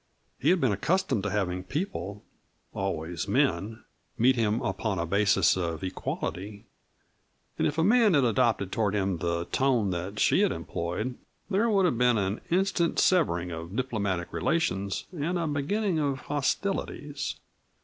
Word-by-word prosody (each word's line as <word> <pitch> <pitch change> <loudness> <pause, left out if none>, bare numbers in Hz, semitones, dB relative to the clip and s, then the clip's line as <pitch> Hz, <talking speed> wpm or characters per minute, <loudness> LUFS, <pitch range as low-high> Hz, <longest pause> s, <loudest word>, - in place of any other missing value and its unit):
He 145 - +2
had 185 +1 +4
been 130 -7 +2
accustomed 140 - +1
to 105 - -2
having 90 -3 -1
people 105 - -4 0.5
always 90 -3 -3
men 110 +3 0 0.3
meet 130 +3 +4
him 110 -1 +1
upon 100 +1 -1
a 85 - -1
basis 95 0 +3
of 85 -3 -3
equality, 95 +2 -4 0.9
and - - +3
if 150 - -3
a 165 - +3
man 215 -1 +5
had 140 - +4
adopted 115 -5 +2
toward 105 -3 0
him 95 -4 0
the 85 0 -1
tone 125 -7 +2
that 90 +4 -4
she - - +3
had - - +3
employed 100 +9 -4 0.3
there 210 +4 +2
would 195 -3 +3
have 125 -9 +1
been 125 -2 +4
an 100 +1 -1
instant 180 -1 +1
severing 90 - +2
of 85 +3 -6
diplomatic 100 -8 -2
relations 95 - 0
and 170 +4 -1
a 170 - -1
beginning 160 +6 0
of 140 -3 -1
hostilities. 145 0 -2
110 Hz, 150 wpm, -28 LUFS, 95-150 Hz, 0.9 s, man